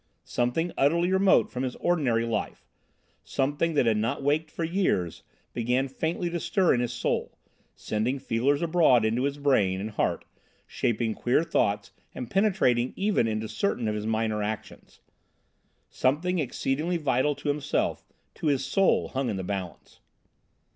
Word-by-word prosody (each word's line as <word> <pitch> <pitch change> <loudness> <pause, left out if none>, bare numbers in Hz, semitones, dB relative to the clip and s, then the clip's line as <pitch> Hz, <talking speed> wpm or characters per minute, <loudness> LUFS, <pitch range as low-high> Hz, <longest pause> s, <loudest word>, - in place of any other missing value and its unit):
Something 125 +8 -1
utterly 170 +6 +3
remote 190 0 +4
from 125 - -4
his 130 -1 -2
ordinary 130 -10 +1
life, 115 -2 -3 0.6
something 145 +4 -1
that 140 - +3
had 110 -2 +3
not 115 +6 -1
waked 150 +3 +1
for 165 - -5
years, 165 - 0 0.3
began 125 +3 0
faintly 160 +6 -2
to 170 - -2
stir 185 +1 +2
in 120 - +1
his 120 -1 -1
soul, 120 - -2 0.4
sending 110 +5 -1
feelers 135 +4 0
abroad 160 -9 +4
into 115 +4 +1
his 140 0 -2
brain 105 -10 +2
and 105 +3 -4
heart, - - -1 0.4
shaping 115 -1 -1
queer 125 +8 +1
thoughts 105 -10 0 0.2
and 125 - -6
penetrating 185 - +2
even 195 - +1
into 110 0 -2
certain 115 - -1
of 105 - 0
his 105 0 -3
minor 110 -1 0
actions. 105 +1 -6 0.9
Something 170 +8 0
exceedingly 150 +4 -1
vital 145 -1 +1
to 145 - -4
himself, 145 0 -1 0.3
to - - -4
his 135 -2 +1
soul, 190 +8 +2
hung 130 -1 -2
in 105 - -2
the 95 - -4
balance. 95 -2 -6
130 Hz, 155 wpm, -27 LUFS, 115-160 Hz, 0.9 s, remote